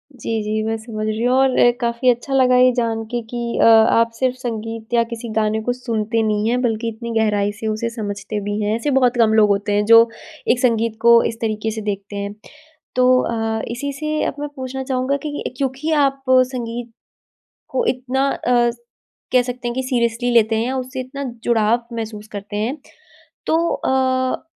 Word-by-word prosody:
जी, 225 -2 -3
जी, 215 +1 -1
मैं 225 - 0
समझ 220 -1 -5
रही 215 +1 -2
हूँ 250 +1 +3
और 265 -1 +3 0.3
काफ़ी 235 +2 +1
अच्छा 245 +3 0
लगा 255 -2 +4
ये 255 0 +6
जान 230 -2 -1
के 240 - 0
कि 235 -1 -3
अ, - - +6
आप 230 +1 +5
सिर्फ़ 255 -1 +1
संगीत 225 -2 -5
या 235 -1 +4
किसी 230 0 -7
गाने 220 0 +1
को 245 +3 -1
सुनते 230 -2 -1
नहीं 210 +1 0
हैं 250 +1 +1
बल्कि 230 -2 -1
इतनी 230 +1 -7
गहराई 205 -2 +1
से 220 - -3
उसे 220 +2 -1
समझते 210 -2 -5
भी 205 +1 -3
हैं, 210 +1 0
ऐसे 235 +6 -1
बहुत 255 -2 +3
कम 225 -2 +4
लोग 215 -1 +5
होते 200 +1 0
हैं 205 0 +2
जो 230 +1 +7 0.4
एक 245 - +1
संगीत 230 -3 +1
को 235 0 +7
इस 225 - -2
तरीके 220 0 -1
से 220 0 -5
देखते 205 -1 -4
हैं। 200 0 -4 0.6
तो 255 0 +4
अ, 225 -1 -1
इसी 280 +4 -3
से 305 +2 -2
अब - - -2
मैं 295 0 -4
पूछना 265 0 -5
चाहूँगा 260 +1 -1
कि 290 -1 -4
क्योंकि 275 +4 -2 0.2
आप 270 0 -6
संगीत 245 -2 +1 0.8
को - - -1
इतना 265 - 0 0.2
अस 240 -1 +2 0.5
कह 255 -1 +5
सकते 250 0 -5
हैं 240 - -3
कि 260 - -1
सीरियसली 245 -1 0
लेते 225 -1 +4
हैं, 235 +4 -1
उससे 260 0 -4
इतना 275 +2 -6 0.2
जुड़ाव 235 0 +2
महसूस 215 -2 -6
करते 205 0 -6
हैं, 230 +8 -2 0.7
तो 320 - +2 0.2
अ, 260 -1 0
235 Hz, 190 wpm, -20 LUFS, 220-255 Hz, 0.8 s, जो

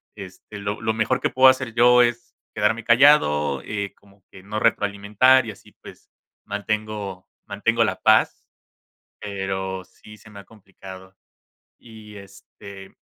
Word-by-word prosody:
este 100 +1 -11
lo 100 +1 -5
lo 110 0 -2
mejor 110 +3 -1
que - - 0
puedo 130 +1 +5
hacer 130 -3 -1
yo 125 +1 +5
es 120 0 -3 0.2
quedarme 110 +2 -1
callado, 95 - +3
eh, 100 -2 -5
como 100 -1 -26
que 95 - -15
no 105 +2 -5
retroalimentar 105 +4 +2
y - - -5
así 100 - -18
pues - - -15 0.3
mantengo 105 -2 -5 0.2
mantengo 115 +3 0
la 110 - -2
paz, 110 0 +2 0.7
pero, 95 -1 -5
sí 95 +3 -17
se 110 - -18
me 105 -2 -12
ha 100 - -14
complicado, 95 -3 -14 0.7
y, 110 -2 -15
este 100 0 -14
105 Hz, 140 wpm, -22 LUFS, 100-115 Hz, 0.7 s, puedo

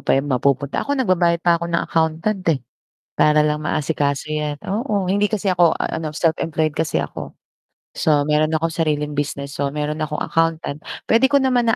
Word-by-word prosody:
pa - - +2
yun 135 - +1
mapupunta, 140 +1 0
ako 285 0 -1
nagbabayad 175 -8 +2
pa 170 -1 +3
ako 170 - -3
ng 170 0 0
accountant 165 +5 0
eh. 150 -5 +2 0.5
Para 150 0 +4
lang 150 0 0
maasikaso 150 -1 -1
'yan, 150 -1 -2
oo. 205 -1 -1
Hindi 200 +3 +1
kasi 200 -2 0
ako 175 -2 +3
ano, 155 -2 -3
self-employed 160 -2 0
kasi 160 +1 -1
ako. - - -4 0.6
So 150 -2 +3
meron 155 +2 +1
akong 165 +1 0
sariling 150 -2 -1
business. 140 -1 -4
So 140 - +1
meron 150 +1 -2
akong 150 -1 -2
accountant, 165 -3 -1 0.3
pwede 235 +4 +5
ko 280 -1 +3
naman 245 -3 +2
na 225 - +3
160 Hz, 180 wpm, -20 LUFS, 150-180 Hz, 0.6 s, pwede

